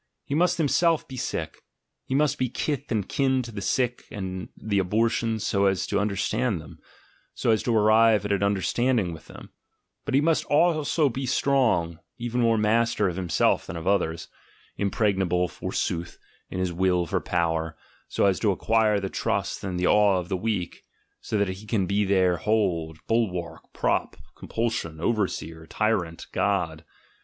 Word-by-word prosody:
He - - -4
must 175 +3 +2
himself 165 +1 +2
be 130 - -8
sick, 80 -9 -4 0.5
he 130 - -1
must 150 -1 +2
be 130 -1 0
kith 140 +2 -3
and 105 -4 0
kin 130 -2 +1
to 120 - -8
the 105 -2 -6
sick 125 +3 -1
and 95 -2 -5
the 100 -2 -1
abortions 110 +3 0
so 100 0 +2
as 95 -1 +1
to 100 - 0
understand 105 +1 0
them, 80 +1 -12 0.6
so - - +1
as 110 - +2
to 115 -2 +1
arrive 110 0 +4
at 105 - -2
an 100 - +1
understanding 100 +1 +1
with 80 - -12
them; - - -12 0.5
but 140 -2 -1
he - - +6
must 160 +2 +2
also 155 -1 +2
be 130 +1 -3
strong, 115 - +1 0.2
even 120 +1 -2
more 115 -1 +3
master 110 0 +2
of 85 - -5
himself 90 -3 +1
than - - -6
of 80 - -6
others, 85 -4 0 0.5
im 100 - 0
pregnable, 95 -5 +1
forsooth, 85 0 -3 0.3
in - - -5
his 90 -1 -1
will 90 0 +1
for - - -1
power, 80 -2 -1 0.3
so - - +1
as 95 -2 +2
to 105 - +2
acquire 110 +1 +2
the 95 - -3
trust 100 0 -2
and 90 -2 -3
the 90 - +1
awe 105 -1 +4
of 90 -1 -4
the 95 - 0
weak, 95 -2 -3 0.4
so 110 - -3
that 100 -1 +1
he 95 +3 -7
can 105 -4 +1
be 100 +3 +1
their 95 -2 +3
hold, 85 -5 0
bulwark, 95 -7 -2
prop, - - -1 0.2
compulsion, 110 -9 -3
overseer, 80 -6 -2
tyrant, 90 -7 -1
god. 85 -6 -1
100 Hz, 170 wpm, -25 LUFS, 90-115 Hz, 0.6 s, he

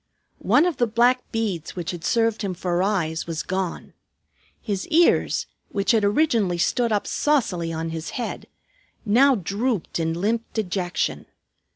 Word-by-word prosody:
One 310 - +4
of 355 -3 -1
the 240 - +2
black 245 +3 +2
beads 205 -8 -3
which 175 -2 -3
had 175 -2 -8
served 225 +3 +1
him 195 -3 -2
for 175 0 -1
eyes 170 -6 -1
was 165 -2 -3
gone. 185 -2 -4 0.7
His 200 -4 -3
ears, 335 +1 +3 0.2
which 200 -1 +1
had 225 -3 +3
originally 210 - +2
stood 235 +7 +1
up 205 -1 +1
saucily 205 - 0
on 165 0 -3
his 160 0 -5
head, 240 - -4 0.6
now 260 +6 +5
drooped 205 0 -2
in 165 0 -1
limp 220 +4 +1
dejection. 185 -4 -2
205 Hz, 150 wpm, -23 LUFS, 175-235 Hz, 0.7 s, now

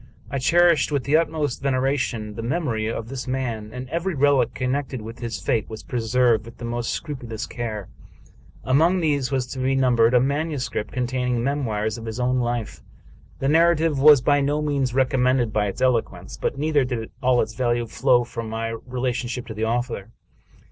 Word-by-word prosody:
I 140 - -1
cherished 170 +1 +4
with 140 -3 0
the 145 - +2
utmost 155 -5 0
veneration 130 -5 -1
the 115 - -6
memory 115 -3 -1
of 115 0 -4
this 130 +1 -6
man, 120 -5 -3
and 125 +2 -7
every 170 +1 -1
relic 140 -3 +3
connected 130 0 -2
with 115 +2 -9
his 115 -2 -4
fate 115 -6 -1
was 110 -1 -8
preserved 120 -1 +1
with 115 - -12
the 120 - -7
most 120 0 -2
scrupulous 120 -6 -4
care. 110 -5 -5 0.8
Among 160 +8 +3
these 145 -6 +1
was 130 -2 0
to 130 - -6
be 130 +1 +1
numbered 125 -2 +3
a - - +7
manuscript 140 -3 -2
containing 125 -1 -1
memoirs 115 -6 -1
of 115 - -8
his 110 +2 -5
own 125 +1 +1
life. 120 -2 -3 0.6
The 135 - -1
narrative 165 -1 +3
was 145 -1 +8
by 145 +2 +3
no 145 +2 +1
means 140 -4 -1
recommended 130 -3 +2
by 105 -1 +1
its 100 - -5
eloquence; 125 -3 0
but - - -2
neither 150 -1 +2
did 120 -3 -4
all 125 -1 +3
its 110 -1 -1
value 120 0 0
flow 120 +2 +2
from 115 -1 -6
my 115 +1 -3 0.2
relation 125 -1 -2
ship 125 -1 -4
to 115 - -7
the 110 +1 -2
author. 115 -3 -2
125 Hz, 185 wpm, -23 LUFS, 115-140 Hz, 0.8 s, was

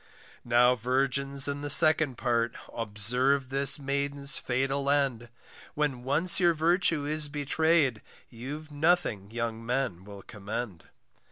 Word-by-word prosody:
Now 120 +1 +3
virgins 135 +3 0
in 140 0 -5
the 145 - -5
second 155 -3 +5
part, 120 -2 -2 0.2
Observe 125 +5 0
this 135 +2 +2
maiden's 140 0 0
fatal 135 +2 -2
end, 135 -5 -1 0.5
When 145 -4 -2
once 155 +9 +4
your 175 -2 +2
virtue 165 -1 +1
is 150 0 -2
betray'd, 145 -3 0 0.3
You've 145 +6 -9
nothing 145 - -1
young 115 0 -5
men 120 -7 -3
will 100 -1 -13
commend. 105 -3 -8
135 Hz, 120 wpm, -27 LUFS, 120-145 Hz, 0.5 s, second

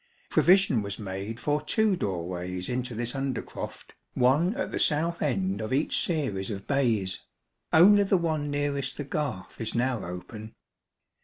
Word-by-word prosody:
Provision 185 - +4
was 100 -1 -4
made 100 +3 -5
for 150 +3 0
two 215 +6 +2
doorways 90 - -3
into 125 -1 -3
this 120 +1 -2
under 135 -2 -2
croft, - - -8 0.2
one 145 - +3
at 280 - -3
the - - -2
south 165 +3 +1
end 95 -6 0
of 110 - -4
each 140 +4 +1
series 130 - -1
of 100 -2 -5
bays; 115 -9 0 0.5
only 205 +5 +7
the 195 -1 +3
one 155 -4 -1
nearest 145 -1 -1
the 145 - -3
garth 140 -11 -4
is 115 - -3
now 120 -2 0
open. 105 +5 -8
130 Hz, 155 wpm, -27 LUFS, 100-150 Hz, 0.5 s, only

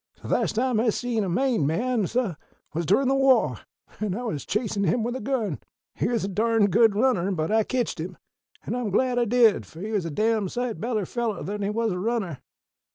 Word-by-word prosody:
"_The - - -6
last - - +1
time 245 -1 +1
I 230 +1 +3
see 240 +1 -1
a 195 -3 0
Maine 240 - +1
man, 225 +5 0
suh, 235 -4 0 0.4
was 165 0 -2
durin' 255 +8 +3
the 270 - +3
wah, 270 -1 +3 0.4
an' 210 -3 -1
I 245 - -4
was 155 - -4
chasin' 210 0 -1
him 200 +6 +1
with 240 +2 -2
a - - -3
gun. 220 - -1 0.3
He - - -1
was 235 -3 0
a - - -1
darned 215 +1 +2
good 220 0 +5
runner; 210 -5 +2
but 160 -2 -1
I 220 0 +4
ketched 245 -5 -2
him, 175 +2 -5 0.5
an' - - -3
I'm 245 -3 -2
glad 245 +5 +1
I 240 - +2
did, 230 -2 +4
fo' 160 - -13
he 210 +4 -5
was 200 -5 0
a - - -2
dam 215 +4 +1
sight 245 0 -3
better 220 -3 -1
feller 235 0 -2
than 205 +2 -4
he 200 - 0
was 225 +1 0
a 180 - -3
runner! 195 - -2
220 Hz, 225 wpm, -25 LUFS, 195-245 Hz, 0.5 s, good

